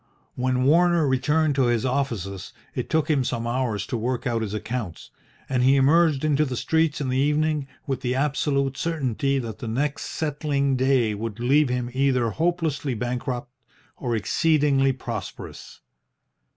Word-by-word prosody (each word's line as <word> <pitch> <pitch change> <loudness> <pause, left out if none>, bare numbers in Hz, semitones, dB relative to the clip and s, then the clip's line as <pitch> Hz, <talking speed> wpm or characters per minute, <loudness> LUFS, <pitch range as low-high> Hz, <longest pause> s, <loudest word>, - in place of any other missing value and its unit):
When 125 0 0
Warner 170 +2 +4
returned 150 +4 +2
to 135 -2 +2
his 120 +1 +1
offices 115 -8 -2 0.2
it - - -4
took 160 -1 +1
him 145 -5 +2
some 115 -2 -2
hours 120 -5 -1
to 130 - -4
work 120 +2 -2
out 115 -2 0
his 105 -1 -3
accounts, 110 -4 -5 0.4
and 130 -2 0
he 130 +2 +5
emerged 150 +1 +3
into 150 0 +3
the 130 -4 -3
streets 160 +1 +1
in 135 - -2
the 130 +1 +1
evening 150 0 +1 0.2
with 135 -3 -3
the 125 -1 -1
absolute 140 -1 0
certainty 140 -4 -1
that 115 -5 -5
the 115 - -6
next 140 +6 -2
settling 145 -3 -1
day 130 -4 +2
would 110 +1 -5
leave 135 +4 +3
him 125 -1 -2
either 130 -3 +1
hopelessly 160 -5 -1
bankrupt 125 +1 -3 0.4
or 120 -3 -2
exceedingly 140 - +2
prosperous. 120 -5 -7
135 Hz, 155 wpm, -24 LUFS, 120-150 Hz, 0.4 s, he